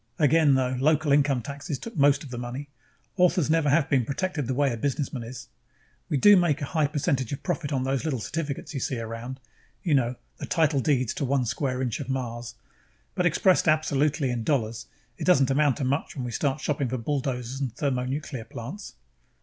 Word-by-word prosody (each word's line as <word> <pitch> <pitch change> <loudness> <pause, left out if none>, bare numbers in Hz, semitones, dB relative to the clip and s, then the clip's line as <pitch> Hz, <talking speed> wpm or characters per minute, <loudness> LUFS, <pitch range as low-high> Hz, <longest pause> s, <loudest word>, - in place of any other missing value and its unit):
Again, 150 -1 +4
though, 130 -1 +1
local 150 +1 +2
income 140 -3 +3
taxes 140 +3 -5
took 230 - -9
most 140 0 +4
of 140 - -10
the 120 - -5
money; 125 +4 -6 0.5
authors 180 -4 +3
never 160 -2 +3
have 145 0 +3
been 135 -3 +2
protected 150 +2 -2
the 130 - -1
way 140 -2 +2
a - - -4
businessman 135 0 -2
is. 120 +3 -8 0.6
We 145 - +1
do 205 +8 +7
make 170 -5 +3
a 145 - -2
high 155 -3 +3
percentage 140 -4 -1
of 140 - -5
profit 170 -5 -2
on 130 -2 0
those 135 0 -1
little 150 -6 -1
certificates 145 +5 -4
you 135 - -2
see 130 -1 -2
around 115 +3 -6 0.4
you 170 - +1
know, 125 -3 +2 0.2
the - - -6
title 155 -4 +2
deeds 130 -4 +1
to - - -3
one 135 -1 +1
square 130 +2 -1
inch 125 +1 -2
of 140 - -6
Mars 120 -2 -4 0.6
but 180 - +2
expressed 180 +2 +3
absolutely, 150 -2 +2
in 120 -2 -2
dollars, 115 -5 -1 0.3
it - - -3
doesn't 140 -7 +4
amount 140 -1 +3
to 145 - -3
much 135 +4 -1
when 130 -3 -4
we 120 - -4
start 140 +3 -1
shopping 140 -3 -1
for 130 - -2
bulldozers 130 0 -3
and 130 -3 -1
thermonuclear 130 -1 -2
power - - -32
plants." 140 - -7
140 Hz, 205 wpm, -26 LUFS, 125-150 Hz, 0.6 s, do